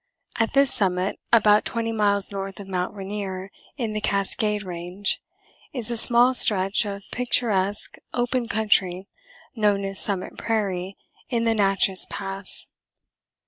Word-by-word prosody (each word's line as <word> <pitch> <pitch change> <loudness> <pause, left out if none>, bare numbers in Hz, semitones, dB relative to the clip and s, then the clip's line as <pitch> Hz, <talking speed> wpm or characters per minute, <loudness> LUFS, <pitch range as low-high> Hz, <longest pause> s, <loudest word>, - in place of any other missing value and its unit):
At 225 0 0
this 275 -1 +3
summit, 185 -3 -1
about 210 -2 +5
twenty 230 -2 -3
miles 205 -3 +2
north 195 0 -6
of 200 - -9
Mt. 180 -1 -3
Rainier 195 -1 -6 0.3
in 230 -5 -3
the 215 - -3
Cascade 210 +1 -1
range, 180 +2 -4 0.5
is 245 -3 0
a - - -1
small 240 +2 +6
stretch 195 -3 +4
of 200 0 -6
picturesque 210 -5 0
open 245 0 -1
country 195 -4 +1 0.5
known 205 -3 +1
as 195 0 0
Summit 195 -3 -2
Prairie, 195 -4 -2 0.3
in 235 -2 -1
the 230 -1 +2
Natchess 195 -2 +4
Pass. 195 -1 -4
205 Hz, 135 wpm, -23 LUFS, 195-225 Hz, 0.5 s, small